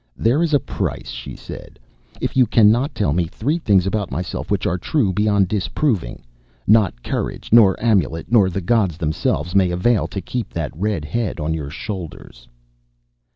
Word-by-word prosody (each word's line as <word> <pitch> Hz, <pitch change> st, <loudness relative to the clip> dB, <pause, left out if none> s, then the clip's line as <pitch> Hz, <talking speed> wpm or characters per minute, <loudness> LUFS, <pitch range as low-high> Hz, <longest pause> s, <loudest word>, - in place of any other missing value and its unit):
"There 125 Hz, +8 st, +2 dB
is 170 Hz, -2 st, +1 dB
a 145 Hz, -, +4 dB
price," 115 Hz, -, -4 dB
she -, -, -7 dB
said. -, -, -10 dB, 0.4 s
"If -, -, -3 dB
you 130 Hz, -2 st, +4 dB
cannot 115 Hz, +6 st, +3 dB
tell 75 Hz, -9 st, +1 dB
me 85 Hz, 0 st, 0 dB
three 145 Hz, -, -2 dB
things 100 Hz, -, +3 dB
about 100 Hz, -1 st, -1 dB
myself 90 Hz, +7 st, -4 dB
which 100 Hz, 0 st, 0 dB
are 90 Hz, -2 st, 0 dB
true 105 Hz, -, 0 dB
beyond 100 Hz, -1 st, +2 dB
disproving, 100 Hz, -, -1 dB, 0.4 s
not 105 Hz, -, +3 dB
courage -, -, -4 dB
nor 105 Hz, -5 st, +6 dB
amulet 95 Hz, -, 0 dB
nor 105 Hz, -6 st, +5 dB
the 95 Hz, +2 st, -3 dB
gods 95 Hz, -4 st, +1 dB
themselves 80 Hz, 0 st, -1 dB
may 95 Hz, -2 st, +4 dB
avail 95 Hz, +6 st, +1 dB
to 100 Hz, -, -5 dB
keep 120 Hz, +6 st, -5 dB
that 80 Hz, -3 st, -4 dB
red 95 Hz, -3 st, -2 dB
head 105 Hz, +4 st, -2 dB
on 80 Hz, +1 st, -1 dB
your 75 Hz, -3 st, -4 dB
shoulders." 80 Hz, -, -8 dB
95 Hz, 170 wpm, -20 LUFS, 85-115 Hz, 0.4 s, nor